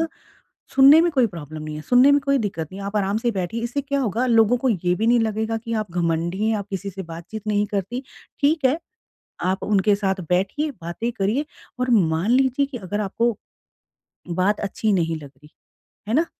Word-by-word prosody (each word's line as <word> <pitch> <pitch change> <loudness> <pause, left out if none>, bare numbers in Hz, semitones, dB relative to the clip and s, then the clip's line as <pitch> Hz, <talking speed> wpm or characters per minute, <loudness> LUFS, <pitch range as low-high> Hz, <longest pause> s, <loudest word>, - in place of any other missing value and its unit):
अ, - - -2 0.7
सुनने 275 +4 +8
में 340 +1 +3
कोई 260 -4 +3
प्रॉब्लम 155 -5 -8
नहीं 155 0 -6
है। - - -6
सुनने 250 - +5
में 285 - +4
कोई 275 0 +1
दिक्कत 190 - -3
नहीं 195 - -7
है, 195 - -5
आप 205 +1 -3
आराम 200 0 +1
से 240 +1 0
बैठिए, 190 +4 -3
इससे 245 +4 -2
क्या 280 0 -1
होगा 240 0 0
लोगों 230 0 +4
को - - +4
ये 180 -5 +1
भी 225 - -1
नहीं 240 +1 +5
लगेगा 220 0 -1
कि 230 0 -6
आप 200 - -15
घमंडी 170 +3 -1
हैं, 225 - +2
आप 200 - -6
किसी 195 +1 -4
से 190 +1 -7
बातचीत 170 +6 -9
नहीं 210 0 +1
करती। 205 +6 -3 0.4
ठीक 300 +1 +2
है, 270 +5 +1 0.7
आप 190 +1 0
उनके 205 0 +3
साथ 195 -2 -1
बैठिए, 195 +13 0
बातें 175 +8 -3
करिए 220 +10 -1 0.3
और 250 0 0
मान 175 -3 +2
लीजिए 265 +2 +3
कि 275 -2 -8
अगर 205 +1 -4
आपको 230 +4 0 1.1
बात 205 +3 +2
अच्छी 210 +2 -1
नहीं 165 -3 +1
लग 140 - -11
रही 150 +1 -18 0.6
है - - 0
ना? 315 +6 +3
210 Hz, 210 wpm, -22 LUFS, 185-245 Hz, 1.1 s, सुनने